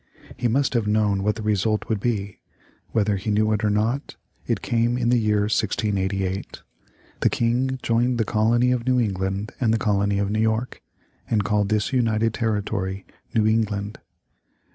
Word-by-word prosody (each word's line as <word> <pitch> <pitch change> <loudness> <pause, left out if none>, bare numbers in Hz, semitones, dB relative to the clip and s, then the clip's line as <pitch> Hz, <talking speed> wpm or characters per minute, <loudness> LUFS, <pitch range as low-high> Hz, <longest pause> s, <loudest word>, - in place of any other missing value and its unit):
He 120 - 0
must 135 +4 +1
have 115 -4 0
known 105 -2 +2
what 105 +2 +1
the 110 - -6
result 105 +1 0
would 110 -3 -1
be. 100 -3 -2 0.5
Whether 105 -2 +1
he 100 +3 -4
knew 110 +1 +2
it 105 +1 -1
or 105 - +3
not, 110 +7 -1 0.3
it - - -1
came 120 +1 +1
in 120 -1 +1
the 120 0 +4
year 105 -2 +2
1688. 100 -2 -1 0.6
The - - +3
King 125 +3 0
joined 120 +2 +1
the 110 - +1
colony 120 +4 +2
of 125 -1 -1
New 130 -1 +3
England 100 -1 -2
and 115 -3 +3
the 115 - +3
colony 100 -2 +1
of 100 0 0
New 110 +1 0
York, 110 +2 -1 0.5
and 105 -3 +2
called 105 0 +1
this 105 +3 0
united 115 -3 +1
territory 100 -4 -2 0.3
New 110 -1 +3
England. 105 -2 0
110 Hz, 170 wpm, -23 LUFS, 100-115 Hz, 0.6 s, the